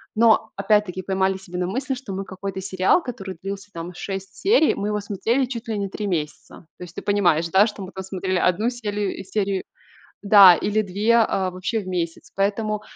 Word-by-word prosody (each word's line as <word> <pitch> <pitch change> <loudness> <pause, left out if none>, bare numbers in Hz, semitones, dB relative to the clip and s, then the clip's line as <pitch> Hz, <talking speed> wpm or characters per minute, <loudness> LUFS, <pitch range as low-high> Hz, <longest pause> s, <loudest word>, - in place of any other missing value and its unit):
Но 220 0 +4
опять-таки 200 -2 +1
поймали 190 0 0
себя 180 -2 -7
на 180 - -1
мысли, 260 +8 -2
что 245 -6 -8
мы 195 +1 -3
какой-то 190 0 -6
сериал, 190 - +2
который 195 - -7
длился, 200 +1 -6
там, 170 +1 -6
6 195 +1 -6
серий, 385 - +3
мы 200 - -3
его 210 0 -1
смотрели 225 +6 0
чуть 240 -2 -7
ли 220 - -1
не 200 -1 -2
3 205 +2 -4
месяца. 160 -1 -4
То - - -9
есть 175 -1 -11
ты - - -5
понимаешь, 175 -5 +2
да, 195 +5 +5
что 210 -2 -7
мы 185 - -8
там 190 - -6
смотрели 190 0 -2
1 185 +7 +2
сели 210 -5 -3
серию, 195 0 -2 0.6
да, 200 -3 +9
или 210 +5 0
2, 210 +4 +1
а, 195 -5 +2
вообще 185 +5 -2
в 190 - -11
месяц. 170 -3 -4
Поэтому 210 +2 0
195 Hz, 200 wpm, -23 LUFS, 185-215 Hz, 0.6 s, да